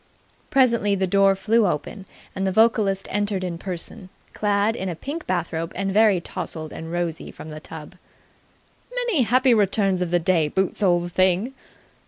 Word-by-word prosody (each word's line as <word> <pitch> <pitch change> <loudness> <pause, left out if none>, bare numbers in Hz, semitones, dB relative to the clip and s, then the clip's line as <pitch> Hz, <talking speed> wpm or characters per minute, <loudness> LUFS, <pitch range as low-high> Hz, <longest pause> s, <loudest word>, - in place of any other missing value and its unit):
Presently 235 -7 +3
the 190 -1 0
door 195 +1 +4
flew 220 +2 +2
open, 175 +5 -4 0.3
and 190 0 -1
the - - +1
vocalist 205 -2 +2
entered 205 -1 -1
in 170 -2 -4
person, 185 0 -5 0.2
clad 205 +1 +1
in 190 -4 -3
a 170 - -4
pink 290 - -6
bathrobe 165 -2 -2
and 195 +1 -2
very 210 -3 +4
tousled 160 -2 -6
and 160 0 -7
rosy 170 -2 -3
from 155 - -10
the 155 - -7
tub. 155 -1 -10 1.0
"Many 485 - 0
happy 255 +2 +4
returns 195 -3 +2
of 180 - -1
the 175 - +3
day, 165 -2 +2
Boots, 190 +6 -1
old 175 -3 +2
thing!" 185 +7 +2
195 Hz, 165 wpm, -23 LUFS, 175-215 Hz, 1.0 s, door